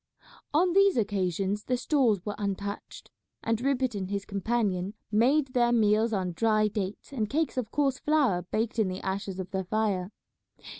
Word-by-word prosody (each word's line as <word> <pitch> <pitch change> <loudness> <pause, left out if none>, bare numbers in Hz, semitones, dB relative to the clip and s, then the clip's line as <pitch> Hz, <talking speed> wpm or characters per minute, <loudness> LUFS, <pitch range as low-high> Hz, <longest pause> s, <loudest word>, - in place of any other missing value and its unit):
On 345 +4 +3
these 395 -4 +5
occasions 200 -1 -1
the 250 - 0
stores 245 - +1
were 210 - -2
untouched, 200 0 -5 0.3
and 225 0 0
Rupert 260 -2 +1
and 190 -2 -4
his 200 -1 -3
companion 200 -2 -1 0.2
made 265 +7 +3
their 240 -1 +3
meals 220 0 +3
on 190 -4 -1
dry 215 +3 +2
dates 205 +2 -4
and 220 -5 -1
cakes 315 +2 0
of 250 -4 -2
coarse 275 0 0
flour 280 -12 +2
baked 220 +6 -2
in 215 - +3
the 185 +1 -4
ashes 190 0 -3
of 185 0 -5
their 190 -2 -2
fire. 200 -2 0
215 Hz, 165 wpm, -28 LUFS, 195-250 Hz, 0.3 s, these